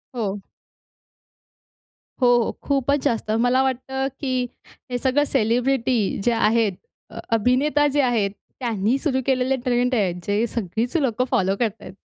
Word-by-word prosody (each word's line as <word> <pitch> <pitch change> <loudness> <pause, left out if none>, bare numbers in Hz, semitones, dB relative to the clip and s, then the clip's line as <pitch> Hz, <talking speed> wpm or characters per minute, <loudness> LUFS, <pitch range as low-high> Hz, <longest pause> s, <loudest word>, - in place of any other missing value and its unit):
हो. 205 -4 -2 1.8
हो, 250 - +5 0.2
हो, - - -2
खूपच 280 0 +1
जास्त 225 -2 0
मला 245 +4 +3
वाटतं, 265 +1 -2
की 255 -3 -1 0.4
हे 245 - 0
सगळं 265 +4 +2
सेलिब्रिटी 250 -1 +1 0.3
जे 240 - +4
आहेत, 225 -2 +2 0.4
अ, - - -9 0.2
अभिनेता 270 +6 +2
जे 290 0 +2
आहेत, 230 -6 +1 0.3
त्यांनी 230 -1 0
सुरु 275 -2 0
केलेले 265 0 +1
ट्रेंड 250 0 +1
आहेत. 190 -6 +1
जे 205 +3 +1
सगळीच 225 - -3
लोकं 255 -4 0
फॉलो 190 +1 +2
करतायेत. 225 -4 -3
245 Hz, 135 wpm, -22 LUFS, 225-265 Hz, 1.8 s, हो